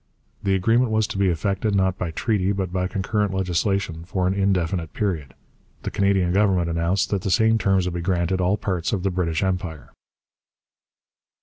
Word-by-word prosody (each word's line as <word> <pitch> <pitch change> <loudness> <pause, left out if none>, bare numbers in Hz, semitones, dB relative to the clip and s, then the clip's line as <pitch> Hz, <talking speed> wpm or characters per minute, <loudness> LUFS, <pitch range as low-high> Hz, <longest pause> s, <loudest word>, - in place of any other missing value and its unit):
The 95 -1 +1
agreement 115 +6 +2
was 110 0 +2
to 100 - -5
be 100 - +3
effected, 100 +4 0
not 95 -1 +1
by 90 - -2
treaty 100 +3 0
but 95 -2 -3
by 90 -1 0
concurrent 100 +1 -1
legislation 90 -2 -1
for 90 +1 -2
an 95 - +2
indefinite 95 -4 0
period. 80 -10 -2 0.5
The - - -3
Canadian 95 -3 +2
Government 95 -4 +2
announced 85 +4 0
that 100 -2 0
the 95 - -2
same 110 +4 +3
terms 95 -3 +2
would 90 - -2
be 85 - -3
granted 90 +1 0
all 95 +3 +2
parts 90 -4 -2
of 95 -3 -1
the 95 - +1
British 85 -1 -1
Empire. 90 -5 -3
95 Hz, 180 wpm, -23 LUFS, 90-100 Hz, 0.5 s, be